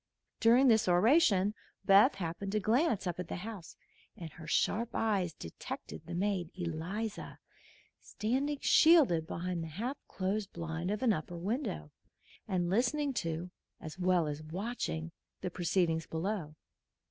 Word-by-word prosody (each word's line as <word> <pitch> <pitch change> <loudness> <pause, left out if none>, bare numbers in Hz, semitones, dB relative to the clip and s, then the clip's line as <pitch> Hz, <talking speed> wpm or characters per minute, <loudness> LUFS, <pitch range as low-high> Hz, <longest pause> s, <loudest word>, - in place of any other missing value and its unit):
During 240 +4 +5
this 225 -1 +4
oration 205 - +4 0.3
Beth 205 +7 +6
happened 195 +2 -4
to 215 - +2
glance 225 - +1
up 175 -1 -3
at 180 - -4
the - - -4
house, 200 -1 -8 0.4
and 165 -3 -7
her 160 +1 -11
sharp 230 +8 0
eyes 200 -6 +1
detected 85 - -8
the 170 - -5
maid, 185 -2 -1
Eliza, 180 +5 -4 0.6
standing 270 +7 -1
shielded 270 - +5
behind 175 0 -3
the - - -5
half 230 - -4
closed 195 +2 -2
blind 165 +1 -4
of 210 +4 -2
an 235 -4 +4
upper 170 +1 -5
window 195 - -3 0.6
and 180 -4 0
listening 265 +9 +1
to, 170 -4 -3 0.3
as 155 +3 -9
well 180 -2 +3
as 150 0 -4
watching, 170 -1 -4 0.3
the 180 - -3
proceedings 170 -2 0
below. 165 -2 -3
185 Hz, 140 wpm, -32 LUFS, 170-225 Hz, 0.6 s, Beth